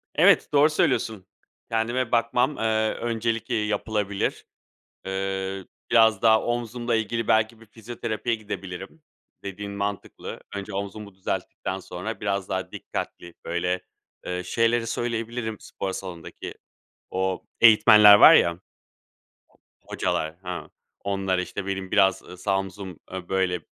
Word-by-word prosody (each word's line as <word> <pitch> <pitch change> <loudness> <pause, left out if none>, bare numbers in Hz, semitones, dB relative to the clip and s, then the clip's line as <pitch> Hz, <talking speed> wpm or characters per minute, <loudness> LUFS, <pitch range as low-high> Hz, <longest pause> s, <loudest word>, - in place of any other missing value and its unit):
Evet, - - +5
doğru 145 +2 +6
söylüyorsun. 110 -9 0 0.5
Kendime 115 +2 0
bakmam, 125 +4 +2
eee, 110 -1 +1
öncelik, 115 0 -2
eee, 110 -3 0
yapılabilir. 105 -1 -2 0.6
Eee, 95 0 -3 0.3
biraz 110 -3 +5
daha 110 -1 +5
omzumla 120 0 -1
ilgili 115 +1 -1
belki 110 +1 +2
bir - - -14
fizyoterapiye 115 +1 -4
gidebilirim. 100 - -7 0.4
Dediğin 100 +1 -6
mantıklı. 100 0 -5
Önce 100 0 -6
omzumu 100 0 -6
düzelttikten 95 0 -4
sonra 95 +4 -6
biraz 100 -2 -2
daha 95 -1 -3
dikkatli, 85 -1 -6
böyle, 90 +2 -1 0.4
eee, 90 0 -2
şeyleri 115 0 +1
söyleyebilirim 115 -1 -3
spor 95 -1 -5
salondaki. 90 -4 -7 0.6
O 95 0 -1 0.2
eğitmenler 105 -2 +9
var - - +9
ya 85 +1 +3 1.2
hocalar, 80 +1 -2
hı, 90 -1 -6 0.3
onlara, 95 -2 0
işte: 95 +2 -5
"Benim 95 -1 -4
biraz, 95 -2 +4
ııı, 90 - -11
sağ 95 +1 0
omzum, 95 -2 -7
ııı, 95 -1 -7
böyle, 95 -2 0
100 Hz, 120 wpm, -25 LUFS, 95-115 Hz, 1.2 s, eğitmenler